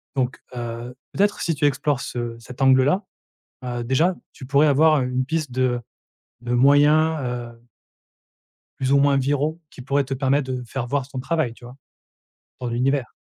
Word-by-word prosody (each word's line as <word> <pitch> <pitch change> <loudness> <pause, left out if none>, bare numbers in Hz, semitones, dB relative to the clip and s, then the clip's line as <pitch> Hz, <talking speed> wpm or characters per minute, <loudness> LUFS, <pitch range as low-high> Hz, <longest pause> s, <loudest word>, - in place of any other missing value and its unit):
donc 130 -1 -1
heu, 120 +1 -6 0.2
peut-être 205 +2 +1
si 165 - 0
tu 145 +1 0
explores 145 0 +1
ce 120 -1 -4
cet 125 +3 -11
angle-là, 135 +8 +4 0.6
heu, 120 -1 -3
déjà, 155 +10 +2 0.2
tu 130 - -11
pourrais 140 +3 +4
avoir 150 0 +4
une 125 +1 -1
piste 155 -3 -2
de 130 -1 +1 0.6
de 120 0 -2
moyens, 145 +4 +4
heu 120 -2 -5 1.2
plus 130 0 0
ou 140 - +6
moins 140 0 +4
viraux 145 +4 0
qui - - -13
pourraient 140 +2 +1
te 135 +1 -3
permettre 135 0 0
de 125 -1 -3
faire 120 +1 -4
voir 135 +1 -2
ton 135 - -7
travail. 140 -2 -1
Tu 120 - -17
vois? 125 +2 -11 0.8
Dans 125 - -4
l'univers. 125 +2 0
135 Hz, 165 wpm, -23 LUFS, 125-145 Hz, 1.2 s, ou